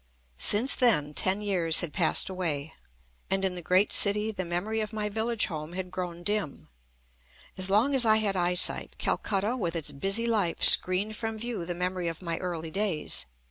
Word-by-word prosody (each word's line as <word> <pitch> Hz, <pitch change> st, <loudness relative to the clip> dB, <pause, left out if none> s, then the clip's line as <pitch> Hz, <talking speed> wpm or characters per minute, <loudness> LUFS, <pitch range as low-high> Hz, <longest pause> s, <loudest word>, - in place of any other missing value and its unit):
Since 235 Hz, +7 st, +3 dB
then 150 Hz, -, +2 dB
ten 190 Hz, +6 st, +1 dB
years 175 Hz, -6 st, +2 dB
had 175 Hz, -4 st, -4 dB
passed 170 Hz, -4 st, +2 dB
away, 160 Hz, -6 st, -4 dB, 0.6 s
and 195 Hz, 0 st, 0 dB
in 190 Hz, -, -2 dB
the 180 Hz, -, -6 dB
great 185 Hz, +4 st, +2 dB
city 210 Hz, +2 st, +4 dB
the 190 Hz, -3 st, -4 dB
memory 180 Hz, +6 st, -3 dB
of 215 Hz, -1 st, -4 dB
my 210 Hz, -1 st, -4 dB
village 225 Hz, +2 st, -1 dB
home 155 Hz, 0 st, -7 dB
had 180 Hz, 0 st, -6 dB
grown 175 Hz, -2 st, -6 dB
dim. 195 Hz, -, -3 dB, 0.9 s
As 185 Hz, 0 st, -1 dB
long 220 Hz, +8 st, +2 dB
as 265 Hz, -2 st, +4 dB
I 220 Hz, -1 st, +4 dB
had 205 Hz, -3 st, 0 dB
eyesight, 180 Hz, 0 st, +1 dB
Calcutta 205 Hz, +4 st, -2 dB
with 175 Hz, -9 st, -4 dB
its 160 Hz, -3 st, -1 dB
busy 195 Hz, +10 st, +1 dB
life 210 Hz, -7 st, -1 dB
screened 195 Hz, +4 st, +6 dB
from 225 Hz, 0 st, -5 dB
view 220 Hz, -6 st, -5 dB
the 175 Hz, -, -4 dB
memory 180 Hz, 0 st, -3 dB
of 165 Hz, -1 st, -5 dB
my 170 Hz, -2 st, -5 dB
early 165 Hz, -3 st, -6 dB
days. 190 Hz, -, -2 dB
185 Hz, 180 wpm, -27 LUFS, 175-215 Hz, 0.9 s, screened